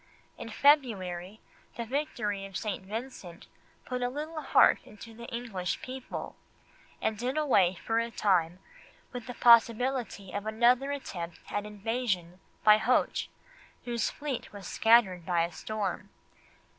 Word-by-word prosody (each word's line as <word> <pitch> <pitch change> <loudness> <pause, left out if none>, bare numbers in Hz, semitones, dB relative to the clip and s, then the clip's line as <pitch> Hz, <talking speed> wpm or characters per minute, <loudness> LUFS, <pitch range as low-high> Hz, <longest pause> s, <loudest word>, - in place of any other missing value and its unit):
In - - -8
February 215 - +2 0.4
the 235 - -3
victory 230 -6 -2
of 195 - -6
St. 210 -3 -4
Vincent 205 -4 -7 0.4
put 250 -1 -3
a 245 - 0
little 310 +4 -5
heart - - +5
into 225 +2 -12
the 235 +1 -10
English 230 -7 -3
people, 260 0 -6 0.6
and 220 - 0
did 255 +5 -2
away 200 -12 +3
for 225 +5 -1
a 230 0 -1
time 180 -6 +1 0.6
with 245 -1 -6
the 245 - -6
possibility 235 -3 +3
of 205 +2 -4
another 240 +5 +3
attempt 175 -12 -6
at 205 0 -2
invasion 205 -4 -2 0.2
by 215 0 +8
Hoche, 250 +3 +1 0.6
whose 235 -2 0
fleet 285 -4 -5
was 200 -2 -10
scattered 225 -6 +4
by 170 -1 +1
a 170 - -2
storm. 200 +2 -4
225 Hz, 135 wpm, -29 LUFS, 195-245 Hz, 0.6 s, by